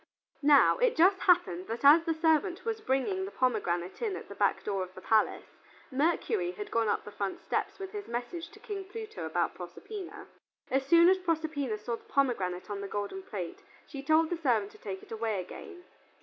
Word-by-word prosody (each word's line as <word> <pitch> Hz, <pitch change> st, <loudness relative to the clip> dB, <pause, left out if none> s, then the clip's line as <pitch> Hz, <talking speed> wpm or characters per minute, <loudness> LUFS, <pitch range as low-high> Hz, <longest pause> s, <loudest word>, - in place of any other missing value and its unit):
Now 290 Hz, -, +6 dB
it -, -, +3 dB
just 375 Hz, +3 st, +5 dB
happened 190 Hz, -, +2 dB
that 230 Hz, +5 st, -4 dB
as 315 Hz, +4 st, +8 dB
the 330 Hz, -, +1 dB
servant 325 Hz, +4 st, +1 dB
was 445 Hz, -1 st, -2 dB
bringing 380 Hz, +7 st, 0 dB
the 385 Hz, -, -4 dB
pomegranate 180 Hz, -, -1 dB
in 430 Hz, -5 st, -1 dB
at -, -, -9 dB
the -, -, -7 dB
back -, -, +1 dB
door 200 Hz, -2 st, -1 dB
of 185 Hz, 0 st, -6 dB
the -, -, -8 dB
palace, 220 Hz, +2 st, +1 dB, 0.3 s
Mercury 350 Hz, -, 0 dB
had 415 Hz, +1 st, -7 dB
gone 230 Hz, -1 st, +1 dB
up 205 Hz, -, 0 dB
to -, -, -25 dB
the -, -, -21 dB
front 195 Hz, -2 st, -3 dB
steps -, -, -2 dB
with 385 Hz, -1 st, -7 dB
his 415 Hz, -1 st, -6 dB
message 245 Hz, +9 st, -4 dB
to 425 Hz, -, -16 dB
King 405 Hz, -3 st, -6 dB
Pluto 435 Hz, +2 st, -7 dB
about -, -, 0 dB
Proserpina. 405 Hz, -5 st, -8 dB, 0.5 s
As 270 Hz, +1 st, +1 dB
soon 335 Hz, +3 st, +7 dB
as 375 Hz, +1 st, +5 dB
Proserpina 310 Hz, -9 st, -1 dB
saw 230 Hz, +2 st, -4 dB
the -, -, -22 dB
pomegranate 195 Hz, -10 st, 0 dB
on 200 Hz, -1 st, -4 dB
the 200 Hz, -, -4 dB
golden 205 Hz, -, -4 dB
plate, 210 Hz, -, -6 dB, 0.2 s
she 275 Hz, -, -7 dB
told 315 Hz, +3 st, +3 dB
the 350 Hz, -, 0 dB
servant 235 Hz, -10 st, +1 dB
to -, -, -17 dB
take 190 Hz, -2 st, -6 dB
it -, -, -16 dB
away 220 Hz, -2 st, -1 dB
again. 355 Hz, -, -9 dB
300 Hz, 205 wpm, -30 LUFS, -, 0.5 s, as